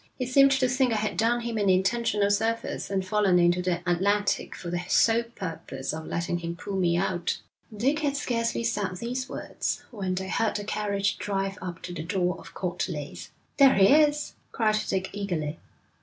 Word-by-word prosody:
He 255 - -2
seemed 275 +2 +6
to 265 -1 +2
think 255 0 +2
I - - +1
had 215 0 -1
done 235 +2 +2
him 230 -2 -3
an 200 -2 +2
intentional 200 +2 +2
service, 225 +3 -1
and 190 -1 -1
fallen 195 -2 +3
into 175 +1 +3
the 180 -1 -1
Atlantic 200 +4 +1
for 175 - -6
the 175 0 -1
sole 230 +4 +4
purpose 175 - -6
of 160 0 -6
letting 175 +1 -2
him 170 0 -4
pull 195 +3 -6
me 175 -2 +2
out.' 175 -2 -1 0.4
Dick 275 +8 +1
had 285 -2 0
scarcely 235 -4 -1
said 205 -5 -1
these 250 +4 -4
words - - -3
when 190 -5 -2
they 190 +1 -3
heard 220 +3 0
the 205 - -2
carriage 200 -1 -1
drive 195 0 -2
up 180 -1 -6
to 175 - -6
the 165 - -5
door 180 +1 0
of - - -13
Court 180 0 -2
Leys. 150 -4 -6 0.3
'There 275 -2 +7
he 195 +5 +6
is,' 300 -1 +3 0.2
cried 215 -2 +2
Dick 190 0 -1
eagerly. 170 -7 -3
Mrs. - - -31
200 Hz, 195 wpm, -27 LUFS, 180-230 Hz, 0.4 s, There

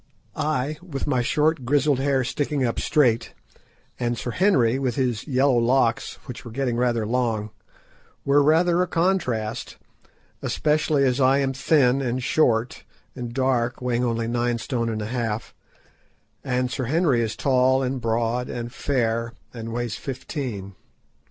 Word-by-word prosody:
I, 150 0 -1
with 160 -7 -5
my 130 -4 +1
short 150 +3 +1
grizzled 145 +2 +2
hair 135 -1 +1
sticking 140 +1 -1
up 115 - -1
straight, 120 -6 +2 0.6
and 120 -1 -1
Sir 120 - -4
Henry 135 - +3
with 130 -4 -1
his 125 -3 -1
yellow 135 -2 +3
locks, 120 -1 +1
which 125 -3 -8
were 120 - -8
getting 125 +1 -1
rather 120 -2 +1
long, 110 -2 -1 0.7
were 140 +1 +4
rather 170 +4 +3
a 180 - +1
contrast, 165 - -1 0.6
especially 150 -1 +1
as 130 0 +2
I 130 +1 +5
am 135 -1 0
thin, 135 -1 +3
and 125 -1 -2
short, 120 -5 +1 0.3
and 120 -2 -5
dark, 125 -1 0
weighing 125 -1 0
only 115 -1 -1
nine 120 0 0
stone 115 0 -2
and 110 -1 -3
a 110 +4 -5
half, 115 -3 -3 0.9
and 125 0 -1
Sir 130 - -2
Henry 145 -2 +2
is 110 -1 -2
tall, 130 0 +2
and 130 0 -2
broad, 115 +2 0
and 120 0 -5
fair, 115 -4 -1 0.2
and 115 -1 -6
weighs 120 -1 -3
fifteen. 125 - -5
125 Hz, 150 wpm, -24 LUFS, 115-140 Hz, 0.9 s, I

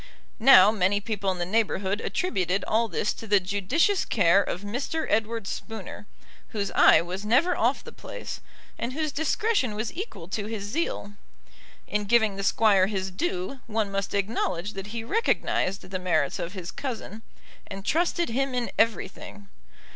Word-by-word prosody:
Now 225 -4 +8
many 205 -1 +1
people 205 -2 -2
in 185 - -1
the 175 - -2
neighbourhood 205 0 0
attributed 195 - -1
all 230 +1 +1
this 205 +1 -1
to 225 - -10
the 205 -1 +5
judicious 205 - +1
care 195 -2 +4
of 180 - -4
Mr. 260 +9 -3
Edward 225 0 0
Spooner, 210 0 -7 0.4
whose 200 -3 -3
eye - - +6
was 185 +3 -5
never 265 +12 +3
off - - +1
the - - -10
place, - - -8 0.4
and 240 +2 -3
whose 310 +1 -2
discretion 320 - 0
was 215 +1 -3
equal 335 - -6
to 205 +1 -3
his 220 -2 -4
zeal. 205 -3 -3 0.7
In 210 0 -2
giving 220 -2 +3
the 195 - -4
Squire 200 -2 +4
his 190 -2 -3
due, 350 - -3
one 215 -2 -1
must 195 0 -2
acknowledge 200 -2 -1
that 195 +1 -6
he 225 +1 -5
recognised 230 - 0
the 185 0 -5
merits 160 -6 0
of 170 +2 -4
his 185 -3 -6
cousin, 225 -5 -6 0.5
and 195 0 -8
trusted 345 +1 +1
him 265 +2 -1
in 245 -1 -1
everything. 205 -2 -1
210 Hz, 160 wpm, -26 LUFS, 195-245 Hz, 0.7 s, Now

